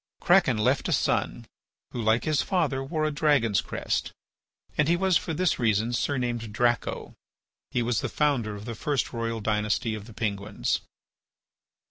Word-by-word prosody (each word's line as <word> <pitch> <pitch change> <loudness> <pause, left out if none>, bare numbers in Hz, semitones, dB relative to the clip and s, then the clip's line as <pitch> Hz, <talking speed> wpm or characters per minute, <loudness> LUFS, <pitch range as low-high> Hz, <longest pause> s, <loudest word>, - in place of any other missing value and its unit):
Kraken 175 - +4
left 105 - +1
a - - 0
son, - - 0 0.5
who, 120 - -4
like 110 +1 +2
his 155 -2 +1
father, 145 -8 0
wore 155 +3 -1
a 155 - 0
dragon's 145 - +2
crest, - - -2 0.6
and 150 - +2
he 170 - +4
was 190 0 +2
for 165 - +1
this 175 +3 +1
reason 115 0 +1
surnamed 120 -3 -1
Draco. 120 +1 0 0.6
He 120 - 0
was 115 -2 0
the - - -2
founder 130 -8 0
of 100 +1 -9
the 115 - -4
first 135 +3 -1
royal 115 -1 -2
dynasty 105 +1 0
of 105 -1 -6
the 115 - -12
Penguins. 100 - -2
120 Hz, 160 wpm, -27 LUFS, 110-150 Hz, 0.6 s, Kraken